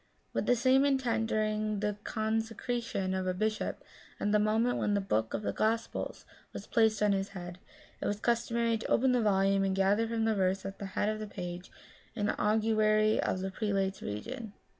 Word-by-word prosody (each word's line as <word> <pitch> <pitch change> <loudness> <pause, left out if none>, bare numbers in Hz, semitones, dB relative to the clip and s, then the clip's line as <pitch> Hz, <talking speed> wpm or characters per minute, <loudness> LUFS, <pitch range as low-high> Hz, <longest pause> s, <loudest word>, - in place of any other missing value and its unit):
With - - -1
the 245 - +5
same 260 +3 +4
intent 260 -5 +1
during 215 -1 0
the 210 0 -1
consecration 225 -2 -2
of 190 0 -1
a 185 - 0
bishop, 215 +2 -2 0.4
at 205 - 0
the 210 - +4
moment 220 +3 +2
when 205 - +1
the - - +2
book 110 - -1
of 210 - -4
the - - -1
Gospels 225 +1 -1 0.3
was - - -7
placed 220 -3 +2
on 210 - +4
his 195 0 0
head, 175 0 -7 0.4
it - - -1
was 205 0 -1
customary 235 0 +1
to - - -5
open 260 +2 +3
the 250 -1 +3
volume 195 -2 +3
and 190 -1 0
gather 200 +4 +2
from 225 -1 -1
the 225 - +2
verse 190 -1 0
at 195 0 -6
the 200 - -4
head - - +2
of 215 0 -1
the 215 - -5
page 180 -2 -6 0.5
an 210 -2 0
augury 215 0 +2
of 185 - -1
the 190 0 -3
prelate's 195 -2 -1
reign. 220 - -6
215 Hz, 195 wpm, -31 LUFS, 195-225 Hz, 0.5 s, the